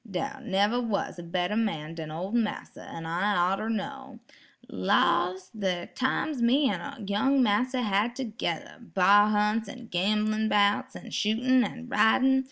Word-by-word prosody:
"Dar 270 +8 -4
neber 210 +3 +1
was 215 -6 -3
a - - -7
better 180 +3 -2
man 165 -9 -2
den 160 -2 -7
ol' 175 +5 -5
massa, 230 -2 -2
an' 165 -1 -7
I 180 +2 +1
orter 215 +3 -2
know. 265 +2 -5 0.5
Lawse, 185 -1 +1
de 185 -5 -2
times 260 +1 -1
me 265 +4 +3
an' 280 -7 -6
young 260 +7 +2
massa 250 +4 +1
had 210 +3 0
t'gedder, 220 -10 -4 0.2
bar 205 +3 +6
hunts, 210 +1 +1
an' 245 -1 -10
gamblin' 215 +4 0
'bouts, 210 +6 +2
an' 230 - -10
shootin' 245 +4 +2
and 245 0 -6
ridin'. 265 +3 +4
215 Hz, 150 wpm, -27 LUFS, 190-245 Hz, 0.5 s, bar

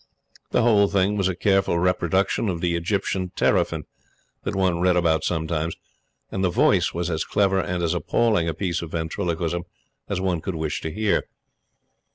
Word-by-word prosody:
The 120 - +2
whole 105 -4 +5
thing 100 +1 +1
was 100 -2 +1
a 95 - -1
careful 95 -1 +2
reproduction 90 +4 +1
of 85 -3 -2
the 85 0 0
Egyptian 90 +1 -1
teraphin - - +1 0.6
that 100 - -3
one 95 -3 +1
read 90 0 +3
about 80 -2 +2
sometimes 80 -1 -1 0.6
and 95 - -2
the 95 - +3
voice - - +3
was 85 0 -2
as 80 -1 -1
clever 95 -2 +2
and 90 -1 -2
as 85 0 +1
appalling 90 +1 +1
a 80 - -3
piece 90 -4 -2
of 85 -2 -8
ventriloquism 85 0 -2 0.5
as - - -1
one 90 -3 -1
could 95 - -4
wish 80 -1 -2
to 80 - -4
hear. 105 +4 0
90 Hz, 175 wpm, -24 LUFS, 85-95 Hz, 0.6 s, whole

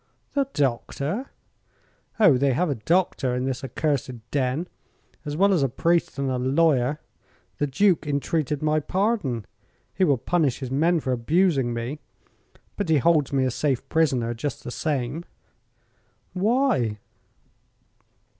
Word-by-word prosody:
"The 280 -2 +1
doctor?" 140 - -1 0.9
"Oh, 200 -11 +6
they 135 +1 +2
have 170 +4 +1
a 120 -6 -4
doctor 165 -8 +2
in 125 +1 -1
this 130 -1 -3
accursed 130 -5 -3
den, 140 +4 0 0.6
as 145 0 -4
well 200 +2 +4
as 175 - +2
a 135 - +2
priest 165 +7 0
and 140 0 -1
a 125 - -1
lawyer. 140 +1 +2 0.6
The 145 - +1
Duke 170 +3 +2
entreated 145 0 -1
my 155 0 +2
pardon. 180 - -1 0.5
He 190 - 0
will 145 -7 +4
punish 145 0 0
his 130 -2 -6
men 165 +4 +2
for 130 - -2
abusing 135 +1 +2
me. 120 +5 -4 0.8
But 205 -5 -2
he 160 - +5
holds 150 0 +3
me 135 -1 +2
a 130 - 0
safe 135 0 -1
prisoner, 130 -8 +1
just 130 +5 -5
the - - -6
same." 145 +2 -2 1.1
"Why?" 195 - +1
145 Hz, 140 wpm, -24 LUFS, 130-170 Hz, 1.1 s, Oh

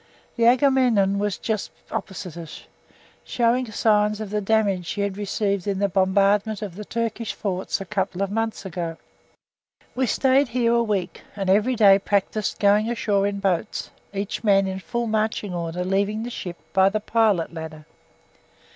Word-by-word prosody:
The 230 - +2
Agamemnon 245 -7 +3
was 205 -1 -1
just 215 -3 -2 0.2
opposite 180 -3 -5
us, 165 -2 -9 0.6
showing 240 0 0
signs 210 -1 +2
of 215 -2 -6
the 210 0 0
damage 200 -4 +1
she 205 - -3
had 200 -1 -1
received 200 -1 -2
in 200 -1 0
the 200 +1 +2
bombardment 200 +3 +2
of 200 -4 -5
the 210 +4 -7
Turkish 230 0 -3
forts 190 -3 -2
a 195 - -6
couple 195 -1 -2
of 195 - -3
months 225 0 -2
before. 170 -3 -4 1.0
We 260 0 0
stayed 265 +4 +3
here 235 0 +1
a 235 - +3
week, 205 -6 -2
and 195 -2 0
every 215 +6 +3
day 200 -3 +6
practised 205 +1 -1
going 210 +2 +3
ashore 205 -4 +1
in 200 0 -3
boats, 195 +1 -1 0.2
each 200 +2 -4
man 195 -2 +4
in 190 0 -3
full 235 +5 -3
marching 215 -3 -1
order 175 +1 -3
leaving 200 +3 0
the 240 - -5
ship 175 -6 -6 0.2
by 190 0 +5
the 215 +2 -1
pilot 210 -6 +1
ladder. 160 -2 -8
205 Hz, 165 wpm, -23 LUFS, 190-220 Hz, 1.0 s, day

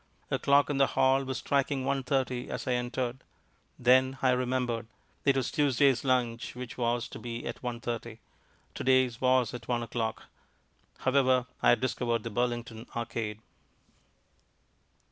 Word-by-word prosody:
A - - +1
clock 140 +1 +4
in 140 - -1
the 135 - +5
hall 135 +1 +4
was 130 0 -3
striking 140 -1 0
one 135 0 0
thirty 130 -2 -1
as - - -4
I - - +1
entered. 125 +1 -2 0.6
Then 130 +2 +4
I 130 - +5
remembered. 125 -2 -1 0.4
It 140 -1 +4
was 130 - -1
Tuesday's 140 -3 +3
lunch 120 -4 0
which 125 -1 -7
was 120 -1 0
to - - -8
be 120 0 -6
at 120 - -5
one 120 -2 -4
thirty. 120 -1 -5 0.6
To - - -5
day's 130 -2 +3
was 130 -3 +3
at 120 -2 -8
one 120 -1 0
o'clock... 115 -1 -3 0.8
However, 130 -2 +3 0.2
I - - +5
had - - +4
discovered 120 -3 -1
the 115 - -5
Burlington 120 0 -2
Arcade. 110 -2 -3
125 Hz, 155 wpm, -29 LUFS, 120-130 Hz, 0.8 s, the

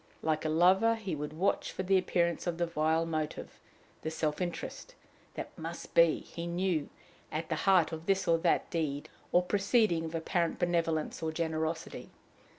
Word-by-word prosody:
Like 155 0 0
a - - +1
lover, 185 +8 +4
he 205 -6 -4
would 150 0 -4
watch 180 +6 0
for 190 - -4
the 190 +1 +3
appearance 170 -2 +1
of 170 -1 -1
the 175 - +1
vile 160 0 +1
motive, 155 -2 -4 0.4
the 160 - -2
self 155 0 -2
interest, 180 - -5 0.4
that - - -6
"must - - -7
be," - - +5
he 170 0 -7
knew, 170 -3 0 0.4
at 160 +1 -3
the 160 - 0
heart 180 -4 +5
of 160 0 -7
this 195 -1 +2
or 165 -1 +4
that - - +2
deed 145 -4 -2 0.2
or 180 - +4
proceeding 200 -2 +2
of 160 +1 -5
apparent 170 +1 0
benevolence 165 -4 0
or 160 -1 -1
generosity. 160 0 -3
170 Hz, 170 wpm, -31 LUFS, 160-185 Hz, 0.4 s, be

